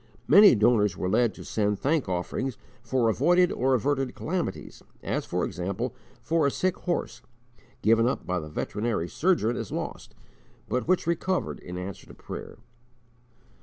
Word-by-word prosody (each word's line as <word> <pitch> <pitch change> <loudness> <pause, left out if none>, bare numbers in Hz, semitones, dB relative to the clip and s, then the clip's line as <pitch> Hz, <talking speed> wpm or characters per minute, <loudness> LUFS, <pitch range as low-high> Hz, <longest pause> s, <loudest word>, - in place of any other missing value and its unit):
Many 205 -7 +8
donors 105 -3 +3
were 90 - -2
led 110 +3 +2
to - - -10
send 105 -1 0
thank 140 -1 0
offerings 95 +8 -2 0.2
for 120 0 +1
avoided 175 +11 +3
or 130 +1 +2
averted 135 +1 0
calamities: 180 +1 -4 0.2
as, - - -2
for - - -1
example, 100 +7 -3 0.3
for 160 -3 +2
a - - +3
sick 185 +5 0
horse, 175 -2 -3 0.6
given 115 +2 +4
up 130 - -2
by 90 0 -1
the 75 -2 -8
veterinary 105 +2 -2
surgeon 145 - +1
as 115 -4 -5
lost, - - -5 0.5
but 125 +3 -2
which 185 +1 +2
recovered 170 +2 -1
in 90 0 -8
answer 95 +2 -7
to - - -13
prayer. - - -8
120 Hz, 155 wpm, -27 LUFS, 105-160 Hz, 0.6 s, Many